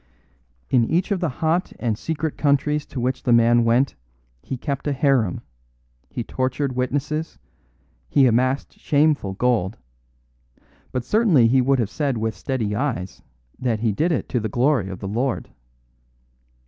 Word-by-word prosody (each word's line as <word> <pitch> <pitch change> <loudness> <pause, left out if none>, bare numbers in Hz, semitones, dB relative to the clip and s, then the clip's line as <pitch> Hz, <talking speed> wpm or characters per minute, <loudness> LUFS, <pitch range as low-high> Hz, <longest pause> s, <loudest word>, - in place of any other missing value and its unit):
"In 120 - +4
each 175 - 0
of 200 - +1
the 170 -3 0
hot 160 +6 -1
and 115 -3 -1
secret 160 +5 -3
countries 145 +1 +1
to 130 - -6
which 125 +2 -1
the 125 - 0
man 120 0 +5
went 120 +4 +2 0.5
he 130 - -5
kept 140 +2 -4
a 145 - +1
harem, 135 - +1 0.7
he 120 - -4
tortured 130 +2 -2
witnesses, 145 +5 -2 0.7
he 135 - +4
amassed 130 +3 +1
shameful 145 -9 +2
gold; 110 -3 0 1.1
but 125 -2 -3
certainly 195 - +4
he 130 +3 +4
would 135 +2 +2
have 110 -4 -1
said 140 -5 -1
with 110 0 -1
steady 110 +1 -2
eyes 105 -8 -3 0.4
that 115 -4 -1
he 115 -2 +2
did 160 - 0
it 160 - -1
to 125 - 0
the 110 -1 -3
glory 125 -4 +1
of 95 - -6
the 95 - -4
Lord. 120 +6 -2
130 Hz, 155 wpm, -22 LUFS, 115-145 Hz, 1.1 s, man